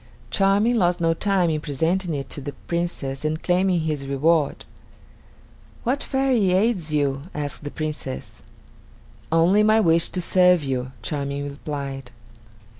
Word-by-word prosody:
Charming 205 +4 +3
lost 180 -3 +2
no 165 -1 +2
time 185 -1 +1
in 155 -1 -1
presenting 165 +4 -1
it 135 -2 -4
to 145 - -5
the 140 +1 -6
Princess 170 -6 -3
and 155 +1 -2
claiming 180 -1 +2
his 150 -3 -3
reward. 145 +2 +1 1.2
"What 260 +4 0
fairy 260 -9 +1
aids 190 -5 +1
you?" 140 -1 0
asked 145 0 -4
the 145 - -4
Princess. 145 - -6 0.9
"Only 170 +6 +4
my 215 +1 +4
wish 165 -4 +3
to 185 - -4
serve 180 -1 +4
you," 130 -2 -2
Charming 140 0 -3
replied. 140 -2 -6
160 Hz, 135 wpm, -23 LUFS, 145-185 Hz, 1.2 s, Only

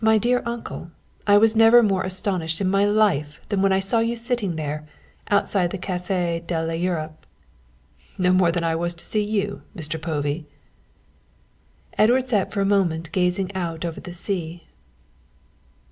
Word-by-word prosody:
"My 220 0 +5
dear 245 +3 +1
uncle, 235 -7 -6 0.4
I 205 0 +7
was 220 +1 +4
never 225 +2 +7
more 195 -3 +1
astonished 185 -4 0
in 195 - 0
my 195 +2 +3
life 200 -9 +1
than 200 -2 0
when 195 0 +3
I 190 - +3
saw 195 +4 +1
you 230 +1 0
sitting 230 -6 -2
there, 150 0 -4 0.4
outside 200 -3 +2
the 195 - -4
Café 180 -2 -2
de 170 -2 -1
l'Europe." 165 -2 -3 0.9
"Not 180 -1 +3
more 185 -2 +4
than 170 0 -2
I 165 -1 +1
was 170 +1 -2
to 170 - -9
see 215 - 0
you, 205 -1 -2 0.2
Mr. 160 -1 -5
Povey." 150 -1 -2 1.5
Edward 245 +4 +4
sat 210 -6 0
for 200 - -1
a - - +2
moment 165 -4 0
gazing 185 +2 0
out 170 -3 -3
over 165 -1 -4
the 180 - -9
sea. 175 -2 -4
185 Hz, 160 wpm, -23 LUFS, 165-205 Hz, 1.5 s, I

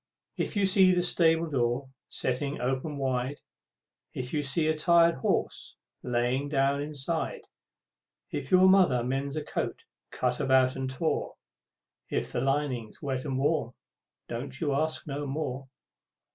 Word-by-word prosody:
If - - -2
you 200 -1 +3
see 190 -1 +6
the 180 0 +2
stable 165 -1 +3
door 130 -2 0 0.2
setting 140 +3 -2
open 130 +4 -2
wide; 130 0 -1 0.8
If 125 +2 -4
you 150 - +1
see 155 +3 +1
a 155 - +2
tired 170 +1 +5
horse 130 - -1 0.3
lying 125 +3 0
down 140 0 +2
inside; 150 +2 -3 0.9
If 135 - -4
your 185 0 +6
mother 180 -11 +5
mends 135 +3 -2
a 155 - -2
coat - - -3 0.3
cut 125 -1 -1
about 130 -2 +3
and 130 -1 -3
tore; 155 +5 -2 0.7
If - - -2
the - - -1
lining's 135 -4 -1
wet 130 -1 -2
and 135 -3 -2
warm, 135 -4 0 0.5
don't 130 +3 -5
you 145 -3 0
ask 155 +3 0
no 145 0 -4
more! 135 -2 -4
140 Hz, 145 wpm, -28 LUFS, 130-155 Hz, 0.9 s, see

